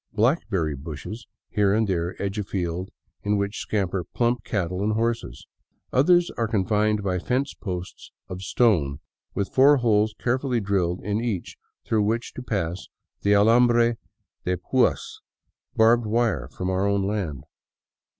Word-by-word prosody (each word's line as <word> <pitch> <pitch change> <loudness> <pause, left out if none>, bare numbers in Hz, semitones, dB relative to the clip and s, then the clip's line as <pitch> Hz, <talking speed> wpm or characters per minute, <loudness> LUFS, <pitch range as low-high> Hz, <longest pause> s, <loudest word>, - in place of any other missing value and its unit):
Blackberry 105 - +1
bushes 80 - -8 0.2
here 100 -1 +2
and 110 0 +2
there 85 -1 -2
edge 100 +1 -2
a - - -1
field 90 -1 -3 0.3
in 105 0 +1
which 100 +1 -2
scamper 95 -3 -1
plump 120 +5 -1
cattle 90 -3 -2
and 110 +1 +1
horses; 115 +1 -2 0.5
others 175 +6 +4
are 115 - +1
confined 105 0 +1
by 90 -2 0
fence 130 +8 -1
posts 90 -3 -7 0.2
of 90 0 -7
stone 85 - +2 0.4
with 100 - -2
four 140 +2 +6
holes 110 -3 +2
carefully 125 0 0
drilled 95 -4 0
in 105 +2 -1
each 105 -8 -3 0.3
through 110 -2 +1
which 115 +3 -1
to - - -7
pass 95 -7 -3 0.3
the 100 - +3
alamhre 120 +2 +4 0.5
de 90 0 0
puas, - - 0 0.2
— - - -51
barbed 115 +1 +4
wire 110 - +1
from 90 +7 -5
our 95 +1 +1
own 100 -1 +1
land. 95 -9 -3
105 Hz, 150 wpm, -25 LUFS, 95-115 Hz, 0.5 s, four